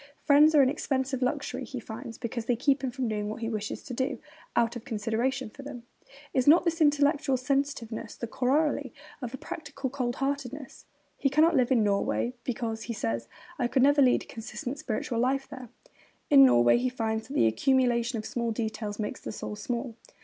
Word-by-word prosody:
'Friends 300 +2 +6
are 285 - +7
an 260 - +3
expensive 265 -2 -1
luxury,' 265 0 -1
he 255 +1 -6
finds, 230 +1 -8
because 235 -1 -4
they 245 - +2
keep 275 +3 +1
him 260 - 0
from 250 0 -3
doing 210 -1 -2
what 215 - -6
he 225 - -2
wishes 215 -2 -4
to 255 - -7
do, 260 +3 -1 0.4
out 235 0 +2
of 240 - -7
consideration 235 +4 -1
for 225 +6 -12
them. 275 -4 -8 0.5
Is 260 -1 +1
not 335 +4 +7
this 335 -1 0
intellectual 290 -2 +3
sensitiveness 255 -3 -2
the - - -5
corollary 275 +6 0 0.3
of 245 -3 -4
a 265 - -6
practical 285 -3 -6
cold 250 -3 -2
heartedness? 275 -1 -4 0.3
He 275 - +2
cannot 310 +4 +4
live 255 -1 +2
in 235 -4 +4
Norway 205 +4 0
because, 225 -2 -3
he - - -1
says, 115 - -3 0.3
'I 245 - +2
could 255 +1 +2
never 285 +1 +5
lead 255 -2 +4
a - - -16
consistent 250 +4 -6
spiritual 235 -4 -2
life 270 +3 +1
there.' 255 -4 -9 0.6
In 275 -2 +9
Norway 120 - +5
he 255 +1 0
finds 220 -3 -2
that 270 - -7
'the - - +4
accumulation 240 - +2
of 215 - -5
small 235 -1 -2
details 220 -2 -3
makes 210 -1 -4
the - - -5
soul 210 - -6
small.' 235 +3 -4
250 Hz, 195 wpm, -28 LUFS, 230-275 Hz, 0.6 s, In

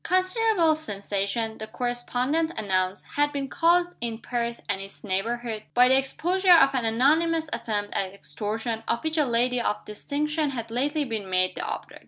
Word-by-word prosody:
Considerable 370 -2 +2
sensation 205 -4 -3
(the 220 - -5
correspondent 245 +7 -1
announced) 190 -2 0
had 290 0 +3
been 280 -1 -3
caused 345 +4 +2
in 230 -1 -2
Perth 235 0 -3
and 200 -2 -2
its 195 0 -10
neighborhood, 225 +3 -2
by 250 +1 +7
the 260 - +6
exposure 355 +8 +3
of 275 -4 +5
an 255 -3 0
anonymous 310 +7 +2
attempt 205 -2 -2
at 190 -1 -1
extortion, 220 +5 -4
of 235 - -1
which 315 0 0
a 300 - +4
lady 245 0 +1
of 210 -2 -2
distinction 300 +7 -2
had 230 -4 -5
lately 290 +5 0
been 220 -6 -4
made 185 0 +2
the - - -5
object. - - -6
245 Hz, 170 wpm, -26 LUFS, 220-300 Hz, -, by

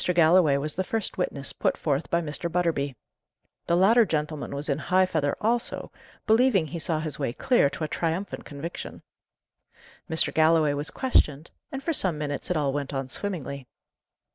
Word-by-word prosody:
Galloway 165 -3 +5
was 150 +2 -2
the 190 - -1
first 220 -1 -3
witness 140 -6 -2
put - - 0
forth 145 0 -1
by 170 - +1
Mr. 165 +2 -2
Butterby. 160 -6 0 0.7
The 170 - +3
latter 225 +6 +6
gentleman 150 -5 -3
was 145 +2 -4
in 140 -1 0
high 185 +3 +3
feather 155 -5 0
also, 230 +2 -1 0.3
believing 220 -5 +4
he 170 +2 -6
saw 160 -1 -1
his 155 -1 -4
way 135 -5 -1
clear 245 - +3
to 155 - -6
a - - 0
triumphant 170 +5 -3
conviction. 150 +4 -7 1.1
Mr. 160 0 +1
Galloway 160 -2 +4
was 145 +1 +1
questioned; 155 - +1 0.2
and 270 0 -5
for 330 - 0
some 185 - +1
minutes 145 -1 -4
it 180 - +1
all 140 -3 0
went 140 -1 -3
on 135 -1 -3
swimmingly. 140 -8 -4
160 Hz, 170 wpm, -26 LUFS, 145-185 Hz, 1.1 s, latter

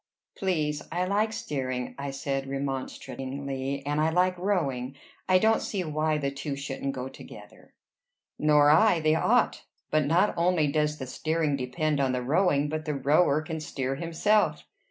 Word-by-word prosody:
"Please, 155 -6 -1
I 180 +2 0
like 210 +3 +1
steering," 130 - -3
I 140 0 -3
said 135 0 -3
remonstratingly. 135 0 -4
"And 145 +1 0
I 160 - +3
like 180 +2 +2
rowing." 140 -10 -1 0.3
"I 185 - +6
don't 220 +4 +3
see 195 -3 -2
why 155 -1 0
the 140 -2 -1
two 140 +1 -4
shouldn't 140 0 -4
go 130 0 -4
together." - - -13 0.6
"Nor 150 -1 +5
I. 175 +3 +5
They 155 0 +2
ought. 160 - +2 0.3
But 155 -1 +2
not 180 +7 +3
only 170 -2 +2
does 150 0 0
the 130 - -5
steering 155 +3 -1
depend 140 +3 -1
on 135 -2 +1
the 125 -1 -2
rowing, 145 +1 +2
but 155 +1 -4
the 150 -2 -2
rower 145 +2 +3
can 160 0 -5
steer 135 -3 -3
himself." 170 +8 +1
150 Hz, 160 wpm, -27 LUFS, 135-165 Hz, 0.6 s, I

